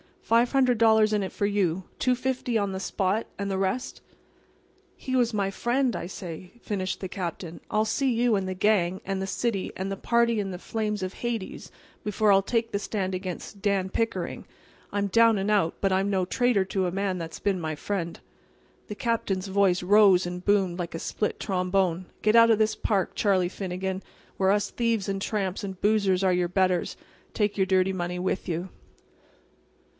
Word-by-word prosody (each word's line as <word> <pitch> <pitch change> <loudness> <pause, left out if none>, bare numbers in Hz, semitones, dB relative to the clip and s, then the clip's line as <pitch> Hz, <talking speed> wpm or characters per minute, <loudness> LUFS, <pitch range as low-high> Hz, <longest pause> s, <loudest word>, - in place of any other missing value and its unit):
"Five 235 +3 +3
hundred 255 -3 +3
dollars 220 -1 +5
in 210 -2 +1
it 190 - -4
for 205 - -1
you. 190 -3 0 0.2
Two 255 0 +2
fifty 250 -2 -1
on 200 -2 0
the 190 - -4
spot, 195 +3 -1
and 200 0 -3
the 190 - -1
rest"— 195 +6 -2 0.9
"He 260 - -6
was 240 -2 +2
my 200 -2 0
friend, 245 +4 0
I - - -4
say," 180 -1 -8
finished 190 -3 -3
the 190 - -4
Captain. 175 -2 -5
"I'll 215 +1 +1
see 260 +4 +1
you 235 -1 +2
and 190 -1 -2
the 185 - -2
gang, 190 -2 +2
and 195 0 -2
the 190 - -3
city, 205 -1 -2
and 190 +1 -3
the 195 - -3
party 235 0 +2
in 200 -1 -2
the 180 - -5
flames 210 +1 -3
of 185 0 -4
Hades 230 -5 -4 0.3
before 210 0 +2
I'll 195 0 +6
take 230 +3 -1
the 200 - -1
stand 195 -2 -2
against 185 +2 -6
Dan 195 -2 +1
Pickering. 225 +3 -2 0.5
I'm 205 0 0
down 230 +2 +5
and 195 +2 0
out; 195 -6 +2
but 195 - +2
I'm 190 +1 +1
no 190 -2 +1
traitor 240 -1 +2
to 190 -1 -1
a - - -2
man 195 0 -1
that's 165 -2 -6
been 195 -2 0
my 155 -2 -3
friend." 170 +1 -4 0.7
The 210 - -6
Captain's 205 -5 -1
voice 190 -2 +2
rose 195 -1 +5
and 180 0 -5
boomed 195 -3 +2
like 170 -2 -4
a - - -4
split 210 - -2
trombone. 185 -2 0 0.2
"Get 215 +1 +3
out 230 0 +7
of 225 - +5
this 215 0 +2
park, 195 -4 0
Charlie 190 -4 +2
Finnegan, 190 0 -4 0.4
where 190 -1 +2
us 205 0 +1
thieves 230 -4 0
and 195 0 -2
tramps 195 -2 -2
and 190 -2 -6
boozers 200 -3 +2
are 185 -1 +3
your 180 -1 +1
betters; 185 0 +1 0.3
and - - -35
take 205 -1 0
your 190 -1 +2
dirty 190 0 +2
money 175 -1 -3
with 185 +1 -2
you." 175 +2 -3
195 Hz, 195 wpm, -26 LUFS, 185-215 Hz, 0.9 s, out